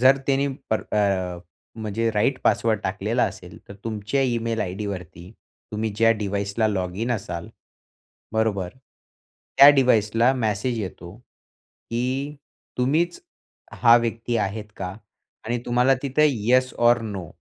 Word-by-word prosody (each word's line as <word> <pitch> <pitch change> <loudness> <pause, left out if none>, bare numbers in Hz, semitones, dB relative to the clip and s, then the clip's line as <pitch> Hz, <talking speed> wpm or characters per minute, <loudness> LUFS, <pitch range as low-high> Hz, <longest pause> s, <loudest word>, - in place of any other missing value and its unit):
जर 130 +2 +6
त्यांनी 140 0 +2 0.2
पर 110 - +1
अ, 95 -4 0 0.4
म्हणजे 110 +2 -1
राइट 130 +6 +1
पासवर्ड 110 -1 +2
टाकलेला - - -1
असेल, - - -7
तर 100 - -9
तुमच्या 110 +4 -2
इमेल 115 -2 -1
आयडीवरती, 90 -3 -5 0.4
तुम्ही 110 +1 -1
ज्या 115 +1 +5
डिव्हाइसला 100 +2 -1
लॉगिन 95 +4 -2
असाल, 85 -6 -5 0.8
बरोबर. 105 -5 0 0.9
त्या 140 - +11
डिव्हाइसला 120 -3 +3
मेसेज 115 0 -1
येतो, 90 -1 -7
की 130 +3 -6 0.4
तुम्हीच 160 - +1 0.6
हा 115 -1 +8
व्यक्ती 115 0 -1
आहेत 105 +1 -2
का? 90 -1 -5 0.5
आणि 120 +2 -1
तुम्हाला 125 +2 +3
तिथे 140 +3 +3
येस 130 +1 +2 0.2
ओर 120 0 +4
नो 100 -5 -5
115 Hz, 120 wpm, -24 LUFS, 100-125 Hz, 0.9 s, त्या